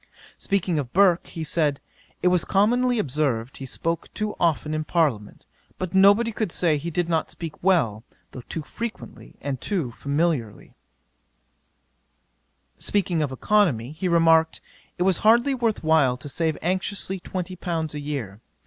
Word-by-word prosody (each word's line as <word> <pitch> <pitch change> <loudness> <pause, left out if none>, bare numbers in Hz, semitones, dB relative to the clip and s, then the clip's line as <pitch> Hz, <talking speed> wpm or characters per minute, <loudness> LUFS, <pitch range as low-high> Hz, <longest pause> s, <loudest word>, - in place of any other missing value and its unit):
'Speaking 185 -5 0
of 130 -4 -5
Burke, 185 -2 +4
he 165 - -6
said, 150 -2 0 0.4
"It 180 - +5
was 180 -2 +2
commonly 245 +5 +2
observed, 135 - -1
he 135 - -7
spoke 165 +6 -3
too 215 -1 -2
often 155 -2 +1
in 155 0 -1
parliament; 145 -11 -1 0.3
but 185 -1 -4
nobody 200 +4 +5
could 215 -4 -3
say 165 -3 +1
he 160 +4 -4
did 175 +1 -1
not 165 -2 0
speak 165 -3 -8
well, 135 - +2 0.3
though 130 - -8
too 160 - -4
frequently 230 +8 -8
and 135 -2 -4
too 170 - -2
familiarly." 140 -5 -2 2.1
'Speaking 185 -5 0
of 145 -3 -1
economy, 140 - +1
he 160 +4 -3
remarked, 165 -1 +4 0.4
it 180 - +1
was 190 -1 +3
hardly 235 +5 +4
worth 230 -7 -1
while 155 -6 +3
to 135 - -9
save 160 +2 -1
anxiously 190 +2 -1
twenty 185 0 -5
pounds 165 -3 -3
a 150 - -4
year. 135 -9 -5
165 Hz, 150 wpm, -24 LUFS, 145-190 Hz, 2.1 s, It